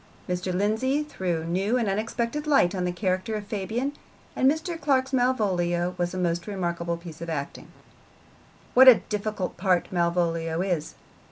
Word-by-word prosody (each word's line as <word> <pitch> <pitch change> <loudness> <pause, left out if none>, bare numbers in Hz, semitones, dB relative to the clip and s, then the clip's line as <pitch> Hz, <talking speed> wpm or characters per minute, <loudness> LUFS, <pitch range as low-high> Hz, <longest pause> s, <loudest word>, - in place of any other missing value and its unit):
Mr. 180 0 -2
Lindsay 220 +10 +1
threw 180 - -3
new 195 +8 0
and 235 -4 0
unexpected 230 +8 -2
light 270 -12 +4
on 180 -2 -1
the 180 - 0
character 185 +3 -1
of 210 -1 -4
Fabian, 220 +7 -2 0.4
and 260 - +4
Mr. 325 +2 -2
Clark's 270 -2 +1
Malvolio 185 -9 +1
was 175 0 0
a 185 - -5
most 175 -1 -1
remarkable 170 -4 -2
piece 170 -2 -11
of 170 - -5
acting. 140 -3 -5 1.1
What 260 +1 +8
a 255 - +12 0.2
difficult 210 -2 -3
part 185 -2 +1
Malvolio 170 -2 0
is! 175 -5 -2
190 Hz, 155 wpm, -26 LUFS, 175-235 Hz, 1.1 s, a